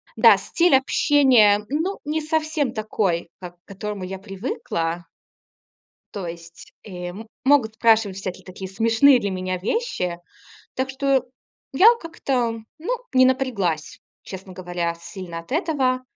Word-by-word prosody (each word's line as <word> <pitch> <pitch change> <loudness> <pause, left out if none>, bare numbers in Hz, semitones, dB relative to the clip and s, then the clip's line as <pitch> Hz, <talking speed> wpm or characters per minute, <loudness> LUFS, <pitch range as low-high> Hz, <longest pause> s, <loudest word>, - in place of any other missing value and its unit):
Да, - - +7
стиль 345 -4 +2
общения, 260 -6 +4
ну, 325 +7 -2
не 310 +2 -1
совсем 310 -4 -1
такой, 200 -6 -1
как 180 -1 -9
к - - -82
которому 200 0 -6
я 190 +1 -5
привыкла. 175 -5 -4 1.1
То 195 -4 -5
есть 170 0 -10
и 180 -3 -7 0.3
могут 260 -6 +3
спрашивать 220 -4 +3
всякие 190 -2 -6
такие 190 0 -8
смешные 230 +6 +4
для 200 - -2
меня 185 0 -3
вещи. 185 - -2 0.6
Так 260 +1 -2
что 270 -1 +1 0.5
я 420 - +7
как-то, 250 -8 -2 0.2
ну, 340 +10 -3 0.2
не 255 0 +6
напряглась, 215 - 0 0.2
честно 190 0 -9
говоря, 175 -2 -3
сильно 175 -1 -8
от 165 - -12
этого. 275 -6 0
220 Hz, 130 wpm, -22 LUFS, 185-270 Hz, 1.1 s, Да